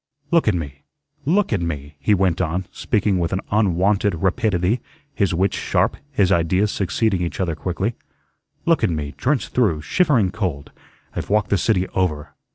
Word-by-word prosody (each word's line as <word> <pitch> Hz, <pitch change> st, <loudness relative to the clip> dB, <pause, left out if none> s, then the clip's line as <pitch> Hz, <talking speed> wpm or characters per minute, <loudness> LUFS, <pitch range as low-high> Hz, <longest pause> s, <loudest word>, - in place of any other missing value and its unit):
"Look 170 Hz, -6 st, +3 dB
at 105 Hz, -, +3 dB
me. 70 Hz, -5 st, -5 dB, 0.5 s
Look 185 Hz, -, +2 dB
at 100 Hz, -, 0 dB
me," 75 Hz, -3 st, -4 dB
he 105 Hz, -, +3 dB
went 90 Hz, -2 st, +1 dB
on, 90 Hz, +2 st, -1 dB
speaking 100 Hz, -2 st, 0 dB
with 85 Hz, -1 st, -1 dB
an 95 Hz, -, -1 dB
unwonted 100 Hz, -1 st, +2 dB
rapidity, 95 Hz, +3 st, +1 dB, 0.3 s
his 100 Hz, -9 st, +1 dB
wits 95 Hz, +3 st, +1 dB
sharp, -, -, +1 dB, 0.2 s
his 100 Hz, -8 st, +2 dB
ideas 90 Hz, +4 st, +2 dB
succeeding 100 Hz, 0 st, 0 dB
each 85 Hz, -, -3 dB
other 90 Hz, -4 st, 0 dB
quickly. 95 Hz, +7 st, -2 dB, 0.7 s
"Look 165 Hz, -7 st, +3 dB
at 110 Hz, -, +3 dB
me, 75 Hz, -3 st, -3 dB
drenched 135 Hz, 0 st, 0 dB
through, 95 Hz, -12 st, +1 dB
shivering 130 Hz, -, +2 dB
cold. 90 Hz, -9 st, -3 dB, 0.4 s
I've -, -, -4 dB
walked 105 Hz, 0 st, +1 dB
the 100 Hz, -, +4 dB
city 95 Hz, -2 st, +1 dB
over. 80 Hz, -6 st, -1 dB
95 Hz, 165 wpm, -21 LUFS, 85-105 Hz, 0.7 s, the